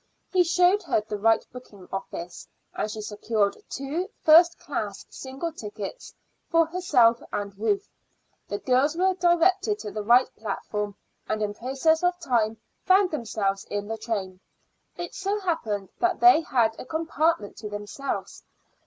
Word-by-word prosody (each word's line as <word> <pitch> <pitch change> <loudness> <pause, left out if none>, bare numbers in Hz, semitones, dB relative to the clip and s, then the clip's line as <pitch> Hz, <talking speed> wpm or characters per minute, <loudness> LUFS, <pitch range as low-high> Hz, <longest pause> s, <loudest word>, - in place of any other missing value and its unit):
He 365 -1 +5
showed 360 +4 +3
her 335 - +1
the 210 -1 -5
right 225 +1 +3
booking 205 -7 -12
office, 175 -2 -6 0.3
and 215 - -2
she 215 0 -5
secured 210 0 0
two 300 +8 -3
first 335 +2 +7
class 210 -8 -5
single 270 +6 -5
tickets 215 - -8 0.3
for 330 -1 +4
herself 295 -10 +3
and 200 -1 -4
Ruth. 390 - 0 0.6
The 205 - -3
girls 265 +7 +2
were 375 +1 +3
directed 365 +3 +3
to 210 - -7
the 215 - -4
right 240 +4 +5
platform, 210 -1 -4 0.3
and 215 0 0
in 205 -1 -2
process 270 +8 +1
of 355 0 +1
time 230 -8 +1 0.3
found 375 0 +4
themselves 210 -8 -2
in 205 0 -4
the 225 +1 -3
train. 195 -5 -3 0.6
It 350 -1 -5
so 400 +2 -2
happened 220 - -2
that 355 0 +1
they 360 -3 +7
had 235 -7 +1
a - - -7
compartment 320 -5 0
to 210 0 -6
themselves. 205 +7 -5
255 Hz, 150 wpm, -26 LUFS, 210-345 Hz, 0.6 s, first